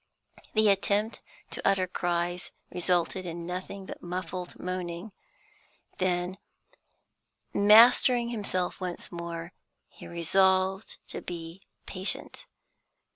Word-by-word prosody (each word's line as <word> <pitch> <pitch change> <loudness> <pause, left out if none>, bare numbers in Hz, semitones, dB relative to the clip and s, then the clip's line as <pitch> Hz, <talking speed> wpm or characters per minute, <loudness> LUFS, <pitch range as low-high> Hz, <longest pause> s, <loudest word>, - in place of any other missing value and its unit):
The 215 0 +5
attempt 200 +3 +1 0.3
to - - -2
utter 195 -1 +3
cries 175 0 -1 0.2
resulted 180 +1 +1
in 170 0 -5
nothing 185 +2 -5
but - - -8
muffled 180 0 -5
moaning. 180 +2 -4 0.9
Then, 180 0 0 1.1
mastering 235 +3 +7
himself 200 -6 -2
once 180 -1 -4
more, 170 0 -6 0.4
he - - -12
resolved 190 +3 +2
to - - -5
be 170 +1 -7 0.2
patient. 195 - -3
185 Hz, 95 wpm, -29 LUFS, 175-195 Hz, 1.1 s, mastering